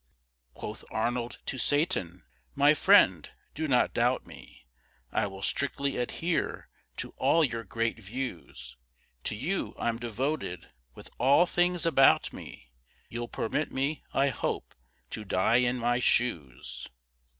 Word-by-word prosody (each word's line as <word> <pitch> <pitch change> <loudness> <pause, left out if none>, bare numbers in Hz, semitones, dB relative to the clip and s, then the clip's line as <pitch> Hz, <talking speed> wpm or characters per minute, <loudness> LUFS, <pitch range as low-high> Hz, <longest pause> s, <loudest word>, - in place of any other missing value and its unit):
Quoth - - -7
Arnold 120 +2 -2
to 130 - -3
Satan: 120 - 0 0.3
"My 145 +2 +6
friend, 150 - +5 0.2
do 155 +1 -2
not 125 -3 +3
doubt - - +1
me! 60 - -13 0.5
I - - +1
will 95 0 -9
strictly 140 0 -1
adhere 160 +7 -2 0.3
to - - -4
all 165 - +4
your 115 -5 -1
great 115 0 -2
views; 115 -3 -6 0.5
To - - -2
you 175 - -2
I'm 115 -1 -1
devoted, 120 - -3 0.2
with - - -12
all 140 +8 +5
things 175 0 +1
about 135 -5 +5
me 60 - -11 0.4
You'll 120 0 -4
permit 150 +7 -2
me, 140 +3 -1
I 140 +1 +3
hope, - - -3 0.4
to 110 - -4
die 95 +3 +2
in 125 0 +2
my 120 0 +1
shoes." 85 - 0
125 Hz, 130 wpm, -29 LUFS, 115-145 Hz, 0.5 s, My